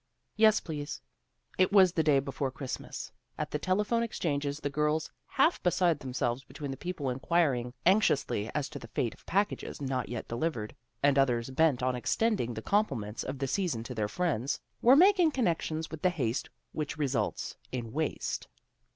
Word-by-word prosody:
Yes, 215 0 +5
please." 150 -3 -5 0.6
It 185 +1 +4
was 190 -3 +7
the 165 - +1
day 150 -3 +4
before 135 0 -1
Christmas. 130 -4 -6 0.3
At 150 -1 -3
the 150 - -1
telephone 210 +7 +1
exchanges 145 -10 -2
the 145 - -2
girls, 150 +2 0 0.2
half 310 +6 +2
beside 175 -3 +2
themselves 130 -1 -2
between 145 -1 -6
the - - -4
people 155 -5 -3
inquiring 130 -3 +1
anxiously 155 - +3
as 145 -2 0
to 145 - -7
the 115 - -10
fate 115 +1 -1
of - - -22
packages 200 +2 -1
not 130 -3 -2
yet 120 -1 -5
delivered, 120 -3 -2 0.3
and 140 -1 +5
others 125 -2 +1
bent 140 -3 +2
on 130 0 +1
extending 160 - 0
the 110 - -6
compliments 115 - 0
of 130 +2 -4
the 135 - -1
season 160 - -1
to 125 - -6
their 110 -3 -1
friends, 145 -3 -1 0.2
were 250 +3 +7
making 365 +1 +6
connections 165 - -1
with 160 -2 -7
the 185 - +4
haste 130 -8 -2 0.2
which 155 0 -4
results 135 -8 -1 0.2
hi 125 -2 -2
waste. 145 +7 -3
145 Hz, 170 wpm, -30 LUFS, 125-180 Hz, 0.6 s, was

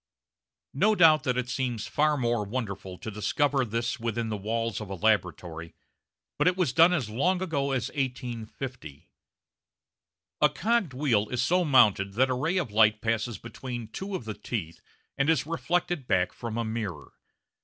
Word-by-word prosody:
No 210 +10 +3
doubt 155 -5 +5
it 125 0 0
seems 125 -3 -2
far 150 0 +1
more 120 -4 0
wonderful 100 -4 -5
to 110 - -7
discover 135 +6 +1
this 120 +3 -2
within 115 0 -2
the 110 - -2
walls 115 +1 -2
of 105 - -7
a 95 - -4
laboratory, 90 -5 -1 0.6
but - - +3
it 180 0 +3
was 170 -9 +1
done 165 +4 +6
as 150 -11 0
long 160 - +1
ago 155 -7 -1
as 130 -2 -1
1850. 125 - -5 1.3
A - - +6
cogged 210 - 0
wheel 115 -7 +1
is 125 -1 0
so 180 +6 +2
mounted 105 - +4
that 130 +4 +2
a - - +2
ray 155 +9 0
of 165 - -1
light 110 0 +4
passes 115 0 -1
between 120 0 -7
two 195 - -5
of 125 - -5
the 110 - -4
teeth 85 -8 -5 0.4
and 140 +3 +2
is 160 -3 +2
reflected 165 -2 -1
back 90 -1 +1
from 115 -2 -5
a 115 - -1
mirror. 105 -10 -5
120 Hz, 165 wpm, -27 LUFS, 110-145 Hz, 1.3 s, done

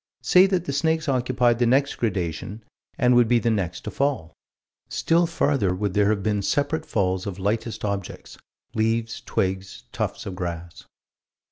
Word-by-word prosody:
Say 185 +1 +6
that 185 -3 0
the 140 - -3
snakes 160 +3 0
occupied 125 -2 +2
the 120 - +3
next 135 +3 +3
gradation, 95 0 -3 0.3
and 125 -1 +4
would 120 -1 +5
be 120 +1 +4
the 115 0 +1
next 90 -5 -2
to - - -6
fall. 135 - -1 0.6
Still 170 +1 +2
farther 140 - +1
would 100 0 -2
there 105 0 +3
have 105 -2 0
been 105 -1 0
separate 145 +9 -1
falls 95 -2 0
of 95 -2 -5
lightest 110 +3 -2
objects: 100 -2 -5 0.4
leaves, 115 +1 -1
twigs, 95 0 -2
tufts - - -3
of 95 - -5
grass. 85 -2 -6
110 Hz, 160 wpm, -24 LUFS, 95-135 Hz, 0.6 s, Say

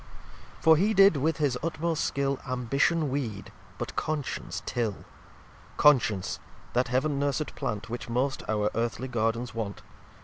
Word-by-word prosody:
xlv - - -21
For 160 0 +7
he 210 +6 +2
did, 195 -4 +7
with 160 +4 +1
his 140 -5 +1
utmost 165 0 -1
Skill, 140 -1 0
Ambition 135 +5 +1
weed, 115 -8 -3 0.3
but - - -5
Conscience 150 -3 -3
till. 115 -5 -2 0.7
Conscience, 115 -10 +3 0.3
that 125 +1 +2
Heaven 140 +3 +1
nursed 145 +1 -1
Plant, 105 -1 -3
Which 120 +1 -6
most 130 +3 0
our 105 -1 +1
Earthly 120 +2 -2
Gardens 115 +1 -1
want. 110 -3 -4
130 Hz, 140 wpm, -28 LUFS, 115-150 Hz, 0.7 s, For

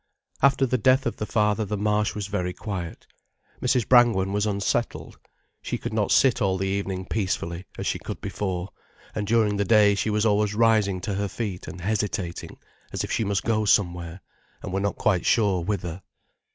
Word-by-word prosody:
After 135 0 +4
the 125 0 0
death 130 +4 +3
of 120 - -2
the 105 - -4
father, 105 0 +1
the 105 0 -3
Marsh 105 +1 0
was 105 -2 -3
very 90 -3 -2
quiet. 90 -6 -6 0.6
Mrs. 125 -2 +1
Brangwen 115 -6 +4
was 105 +1 +1
unsettled. 105 +3 -2 0.4
She - - -3
could - - -5
not 105 -2 0
sit 130 -2 +4
all 95 -2 +1
the 95 - -2
evening 95 -1 -2
peacefully, 95 -4 -2
as - - -4
she - - -1
could - - -6
before, 95 -2 -3 0.4
and 105 -1 -3
during 110 -2 +2
the 100 - +1
day 105 -1 +5
she 100 +2 -1
was 105 +1 +1
always 105 -1 +2
rising 105 -4 +3
to 100 - -3
her 100 +1 -1
feet 100 -3 -5
and 90 - -8
hesitating, 100 -3 -3 0.3
as - - -2
if - - -5
she - - +1
must 100 -2 -1
go 110 -1 +1
somewhere, 90 -3 0 0.4
and 95 - -5
were 95 - 0
not 100 +1 -1
quite 95 -5 +1
sure 100 -6 +2
whither. 90 -2 -3
105 Hz, 190 wpm, -25 LUFS, 95-110 Hz, 0.6 s, day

